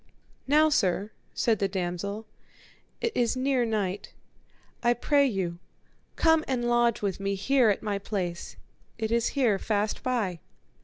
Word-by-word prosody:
Now 305 +3 +5
sir, 200 - +1 0.2
said 225 -4 +1
the 195 - +1
damosel, 195 +3 -3 0.8
it 465 - 0
is 240 +1 +1
near 260 -1 +1
night; 205 -4 -2 0.7
I 240 0 +3
pray 280 +3 +3
you 185 -7 -2 0.6
come 320 -1 +4
and 245 -3 -1
lodge 240 -2 +2
with 195 -2 -1
me 195 0 -1
here 245 +4 +3
at 200 - 0
my 205 -2 -1
place, 180 -4 -4 0.4
it 220 -1 -2
is 235 0 +2
here 230 -8 +3
fast 210 0 -1
by. 215 -9 -1
220 Hz, 145 wpm, -27 LUFS, 195-250 Hz, 0.8 s, Now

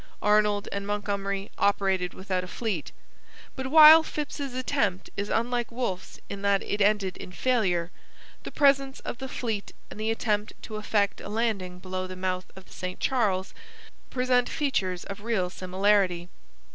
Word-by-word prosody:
Arnold 210 -1 +3
and 200 0 -4
Montgomery 200 -1 -2
operated 190 -3 +1
without 185 -1 -2
a - - -7
fleet. 195 -5 -3 0.6
But 265 -1 -4
while 310 +2 +10
Phips's 290 -4 -5
attempt 255 -8 -1
is 200 +1 -3
unlike 240 +1 0
Wolfe's 230 -7 -4
in 200 - -6
that 200 -1 +2
it 205 - -2
ended 200 -2 +2
in - - -9
failure, 180 -6 +1 0.5
the - - -7
presence 275 -1 +3
of 240 - -6
the 265 -1 -5
fleet 220 -6 -3 0.2
and - - -9
the 215 +1 -1
attempt 215 -2 -1
to 215 - -6
effect 210 -1 0
a - - -7
landing 205 -5 -1
below 185 0 -4
the 185 - -7
mouth 185 0 -2
of 190 0 -12
the - - -16
St 185 0 -5
Charles 200 -8 0 0.6
present 250 -1 +2
features 190 - -1
of 200 0 -8
real 205 -5 -1
similarity. 185 -1 +1
205 Hz, 160 wpm, -27 LUFS, 185-240 Hz, 0.6 s, while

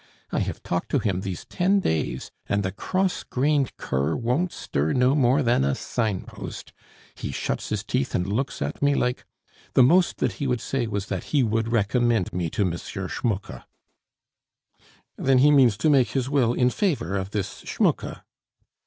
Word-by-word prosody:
I - - 0
have - - -3
talked 90 - -2
to - - +2
him 100 -7 0
these 95 -3 -5
ten 195 +3 +2
days, 80 - -2 0.2
and 100 0 +1
the 95 - -1
cross 185 - -1
grained 140 0 0
cur 70 +4 -1
won't 130 +10 0
stir 75 +3 -1
no 125 +1 +3
more 140 0 +3
than 120 - +3
a 70 0 +1
sign 110 -6 -2
post. - - -9 0.4
He - - -5
shuts - - -3
his 105 -1 -2
teeth 130 +4 -1
and 90 - +1
looks 110 +8 -2
at - - -5
me 145 0 +3
like 125 -1 -1 0.5
The 130 - +7
most 175 +8 +4
that - - 0
he 140 - 0
would 125 -2 0
say 125 -1 -2
was 100 -3 -2
that 95 -3 -4
he 145 -3 +2
would 115 0 0
recommend 115 -2 +1
me 90 -2 -1
to 105 +5 0
M. 90 - 0
Schmucke." 100 +1 -4 1.6
"Then 135 -1 +3
he 145 +4 +6
means 130 -7 +5
to 130 - +1
make 135 -4 +5
his 130 -1 0
will 125 -5 +3
in 125 0 +2
favor 135 - 0
of 95 -1 -2
this 100 -2 -4
Schmucke?" - - -1
120 Hz, 180 wpm, -25 LUFS, 100-135 Hz, 1.6 s, The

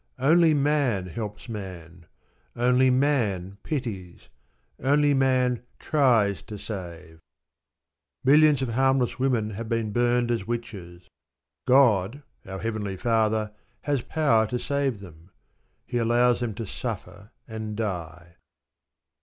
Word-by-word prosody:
Only 160 +4 +4
man 140 -9 +1
helps 105 +4 -7
man. 90 -6 -9 0.5
Only 125 +2 +3
man 110 -9 0
pities; 110 - -5 0.5
only 145 +2 +3
man 130 -2 +2 0.2
tries 115 -9 +2
to 105 -2 -9
save. 85 -6 -8 1.0
Millions 145 0 +5
of 130 - -2
harmless 130 +1 +1
women 120 -5 0
have 110 +2 -6
been 115 -2 -1
burned 120 +1 +1
as 115 -4 -2
witches. 100 -7 -6 0.6
God, 125 -1 +3 0.2
our 95 0 -6
Heavenly 105 -2 -4
Father, 110 0 +1 0.3
has 145 -4 -1
power 120 -7 +2
to 125 - -2
save 135 -3 -2
them. 85 -2 -14 0.6
He 120 - -2
allows 120 +1 +3
them 120 -4 -3
to 115 - -5
suffer 100 +1 -7 0.2
and 110 -2 -6
die. 85 -5 -5
115 Hz, 115 wpm, -25 LUFS, 100-130 Hz, 1.0 s, Millions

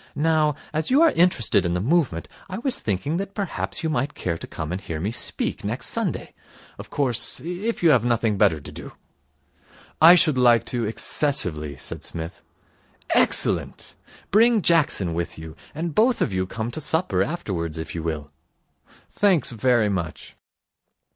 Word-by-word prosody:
Now, 155 -1 +1 0.2
as 155 0 -1
you 280 +5 +4
are 330 - +5
interested 165 - +2
in 85 -1 -1
the - - 0
movement, 125 - 0 0.2
I 185 - -5
was 250 +3 +2
thinking 110 - -2
that 195 +1 -5
perhaps 200 -3 -4
you 160 - 0
might 140 +1 -2
care 85 -3 -3
to - - -9
come 80 0 -6
and 90 +2 -4
hear 80 -5 -6
me 100 +7 -2
speak 120 - -1
next - - -3
Sunday. - - -3 0.5
Of - - -9
course, 130 -5 -1
if 180 +6 -4
you 165 - +6
have 125 -5 +3
nothing 115 -3 0
better 80 -5 +2
to 70 - -10
do.' - - -10 1.1
'I 165 +3 +9
should 155 -7 +2
like 120 -2 +4
to 120 -2 -1
excessively,' 95 - +1
said - - -7
Psmith. 80 +2 -7 0.7
'Excellent. - - +3 0.4
Bring 225 0 +4
Jackson 145 - +2
with 85 +1 -4
you, 80 0 -10 0.2
and 165 +1 -4
both 235 - +2
of - - -1
you 95 0 -1
come 115 +4 -5
to 155 - -5
supper 155 - 0
afterwards, 95 - -3
if 80 - -6
you 85 - -4
will.' 75 -2 -5 0.8
'Thanks 190 -11 +2
very 120 -1 +1
much.' 85 -5 -5
120 Hz, 165 wpm, -23 LUFS, -, 1.1 s, I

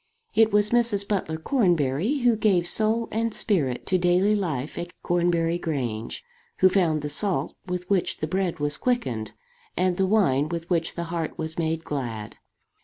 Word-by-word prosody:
It 220 0 +4
was 210 0 +3
Mrs. 230 -4 +3
Butler 185 -6 -1
Cornbury 175 - +1
who 240 -2 +4
gave 195 -5 +2
soul 225 +3 +2
and 230 +1 -1
spirit 145 - 0
to 185 - +1
daily 180 +4 +3
life 155 -9 -3
at 175 - -5
Cornbury 170 -1 +1
Grange, 125 - -3 0.3
who 185 - +5
found 165 -6 +1
the - - -2
salt 165 -2 +1
with 180 0 -4
which 195 -2 0
the - - -2
bread 180 +1 -1
was 145 0 -1
quickened, 225 - -2 0.4
and 185 -1 +1
the 190 - +2
wine 155 -9 +2
with 170 0 -4
which 165 -2 0
the 170 - -3
heart 165 -2 -3
was 160 +1 -3
made 160 0 -1
glad. 120 -8 -5
175 Hz, 170 wpm, -25 LUFS, 155-205 Hz, 0.4 s, who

